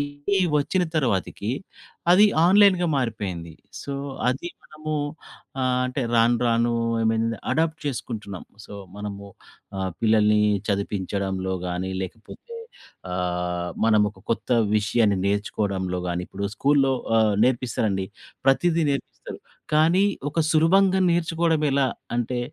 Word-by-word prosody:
ఇది 145 +7 -2 0.2
వచ్చిన 180 +6 0
తర్వాతకి 110 -4 -1 0.6
అది 200 +4 +7 0.2
ఆన్లైన్‌గా 190 -2 +5
మారిపోయింది. 100 - -3 0.3
సో, 140 - -5 0.4
అది 135 +7 -4
మనము 155 0 -6 0.7
ఆహ్, 125 0 +1
అంటే 130 +1 -3
రాను 115 +1 +4
రాను 115 0 +2 0.3
ఐ - - 0
మీన్ 115 0 0 0.3
అడాప్ట్ 160 0 0
చేసుకుంటున్నాం. 110 -7 -5 0.2
సో, - - -10 0.2
మనము 100 -1 -6 0.5
ఆహ్, 95 0 -2
పిల్లల్ని 105 -1 +3 0.3
చదివించడంలో 95 -1 -2
గాని 90 +1 -3
లేకపోతే 110 - -10 0.6
ఆహ్, 90 -1 -2 0.2
మనం 110 -1 +4
ఒక 95 - -21
కొత్త 115 +2 -1 0.2
విషయాన్ని 105 -1 +2
నేర్చుకోవడంలో 100 -2 -1
గాని. 90 0 -2
ఇప్పుడు 100 +1 -6
స్కూల్‌లో 140 -1 +3 0.2
ఆహ్, 110 -2 +3
నేర్పిస్తారండి. 115 -6 0 0.4
ప్రతీదీ 165 +5 +3
నేర్పిస్తారు. 140 - -5 0.3
కానీ 160 +5 +4 0.3
ఒక 150 - -5
సులభంగా 185 +5 +4
నేర్చుకోవడం 165 -2 +1
ఎలా 140 0 +2 0.3
అంటే 120 +1 -1
115 Hz, 115 wpm, -24 LUFS, 100-150 Hz, 0.7 s, అది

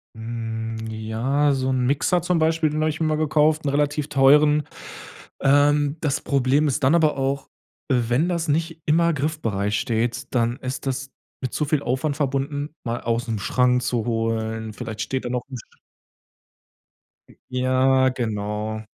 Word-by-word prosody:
Mhm 115 0 -5 0.4
ja, 115 +7 0
so 130 0 -1
'n 130 -1 +1
Mixer 145 +6 +1
zum 175 0 +1
Beispiel, 160 0 +2
den 155 +1 -2
habe 155 - +2
ich 155 - -4
immer 155 -1 +1
gekauft, 155 0 +2
'n - - +2
relativ 145 +1 0
teuren. 150 +2 +5 0.8
Ähm, 145 +1 +3
das 145 -4 0
Problem 140 +2 +2
ist 135 - -1
dann 145 +6 +5
aber 155 -4 +3
auch, 135 +1 -2 0.4
wenn 125 +6 +1
das 170 -1 -1
nicht 160 +2 -1
immer 170 +2 +3
griffbereit 115 -9 -2
steht, 115 +2 -1
dann 120 +1 +1
ist 130 +1 -5
das 135 +1 -3 0.3
mit 130 - -4
zu 150 - 0
viel 145 -1 0
Aufwand 130 +4 -1
verbunden, 145 +1 -2
mal 120 0 -3
ausm 115 -1 -1
Schrank 125 +4 +2
zu 120 -2 -1
holen. 110 -1 -2
Vielleicht 110 -4 -6
steht 130 -1 -3
da 120 - -2
noch 125 -1 -2
'n 130 - -6
St 110 - -14 1.5
Mm. - - -18
Ja, 130 +1 +3
genau. 110 -2 -3
135 Hz, 160 wpm, -23 LUFS, 120-150 Hz, 1.5 s, teuren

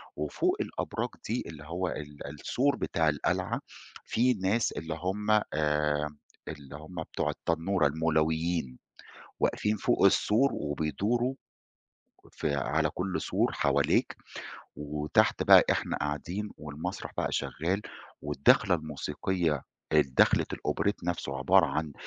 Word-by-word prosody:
وفوق 75 -1 0
الأبراج - - -3 0.2
دي - - -1
اللي 75 -2 -9
هو 85 +4 -3
ال 75 -4 -6
السور 125 - 0
بتاع 80 -10 +1
القلعة 75 -2 -1 0.4
في 125 +3 +2
ناس 105 +2 +1
اللي 80 +2 -4
هم 105 +3 -1 0.2
آآ، 75 0 0 0.3
اللي 75 -2 -8
هم 80 +2 -7
بتاع - - -2
التنورة 85 -1 +1
المولويين، 80 -2 0 0.6
واقفين 105 +1 +1
فوق - - +2
السور 125 +7 +4
وبيدوروا 100 - -1 1.0
في 70 - -1
على 75 +3 +1
كل 90 +4 -3
سور - - +1
حواليك، - - +2 0.6
وتحت 75 0 +1
بقى - - +8
إحنا - - -1
قاعدين 85 +8 -3
والمسرح 75 +5 -6
بقى - - 0
شغّال، 90 +7 -1 0.4
والدخلة 75 +5 +3
الموسيقية 80 0 -2 0.3
الدخلة 70 -4 +4
الأوبريت 100 -2 -1
نفسه 80 -6 -2
عبارة 90 +6 +5
عن 75 +1 -2
80 Hz, 115 wpm, -29 LUFS, 75-95 Hz, 1.0 s, بقى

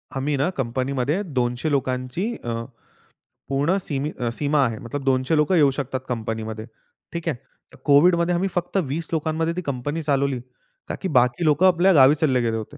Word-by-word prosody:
आम्ही 140 +2 -1
ना 145 +6 +1
कंपनीमध्ये 135 +6 -1
200 125 -2 -1
लोकांची 130 - -1
अ, 115 -1 -3 0.9
पूर्ण 145 +8 +1
सीमी 145 -1 -3
अ, 120 -1 -1
सीमा 145 +2 +1
आहे. 115 -1 -2
मतलब 135 +4 -6
200 130 +3 +1
लोकं 150 +5 +3
येऊ 145 -4 +5
शकतात 135 -1 -3
कंपनीमध्ये. 110 -2 -4 0.5
ठीक 170 0 -5
आहे. 135 - -2 0.4
तर - - -14
कोव्हिडमध्ये 170 +4 +4
आम्ही 190 +2 0
फक्त 175 +2 -2
20 155 +4 -4
लोकांमध्ये 160 +1 -1
ती 180 - -2
कंपनी 145 +1 -3
चालवली. 140 -3 0 0.5
का - - -3
की 190 - -1
बाकी 125 +2 +2
लोकं 155 +5 +4
आपल्या 185 +2 +4
गावी 140 0 +7
चालले 135 -5 +1
गेले 115 -1 0
होते. 110 +7 -8
140 Hz, 175 wpm, -23 LUFS, 125-160 Hz, 0.9 s, गावी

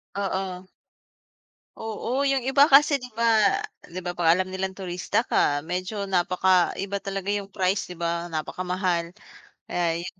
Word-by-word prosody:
Oo. 190 -2 -3 1.1
Oo, 235 +5 -2
yung 270 -2 +1
iba 275 +3 +5
kasi 285 0 +6
'di 250 - -8
ba 230 - -1 0.6
'di 180 +2 -6
ba, 175 - -2
'pag 170 -1 +3
alam 185 0 -1
nilang 190 0 -3
turista 180 -2 -1
ka 145 0 +1
medyo 185 +5 -3
napakaiba 185 +1 +1
talaga 195 0 -3
yung 200 -1 -2
price, 190 0 0
di 180 - -8
ba, 170 0 -2
napakamahal 175 +1 -2 0.5
kaya 170 -1 0
'yon. 185 +1 -9
185 Hz, 140 wpm, -25 LUFS, 175-200 Hz, 1.1 s, kasi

